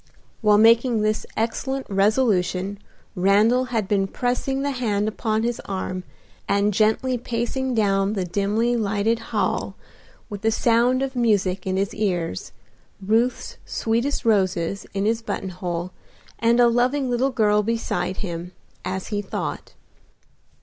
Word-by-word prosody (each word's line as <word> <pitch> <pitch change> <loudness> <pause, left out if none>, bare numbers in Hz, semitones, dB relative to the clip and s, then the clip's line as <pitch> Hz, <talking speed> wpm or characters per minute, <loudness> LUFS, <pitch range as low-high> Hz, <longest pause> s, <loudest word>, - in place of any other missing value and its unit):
While 210 -2 +5
making 230 +1 +4
this 215 0 0
excellent 265 +4 -2
resolution 195 -2 +1 0.3
Randal 210 +6 +3
had 230 -6 -2
been 195 -2 +1
pressing 255 +5 -1
the 285 - 0
hand 215 -5 -1
upon 220 0 -1
his 240 0 -1
arm 185 -1 -4 0.4
and 200 +1 +2
gently 220 +5 +2
pacing 245 +2 -2
down 195 -2 +2
the 190 -4 -1
dimly 210 +6 0
lighted 215 +1 0
hall - - -1 0.5
with 205 -3 -7
the 225 - +2
sound 240 +3 +2
of 270 -1 -4
music 200 -6 +1
in 185 0 0
his 195 0 -1
ears, 175 - -2 0.5
Ruth's 225 +5 0
sweetest 235 +5 -1
roses 195 -3 +1
in 195 +1 0
his 225 +1 +1
button 195 -3 -4
hole, 175 -1 -4 0.5
and 235 +1 +3
a 240 - +7
loving 250 +4 +1
little 250 +2 +1
girl 210 -4 +2
beside 225 -3 -2
him, 175 0 -6 0.3
as 190 0 -4
he 205 -2 -1
thought. 195 - -5
215 Hz, 135 wpm, -23 LUFS, 195-240 Hz, 0.5 s, a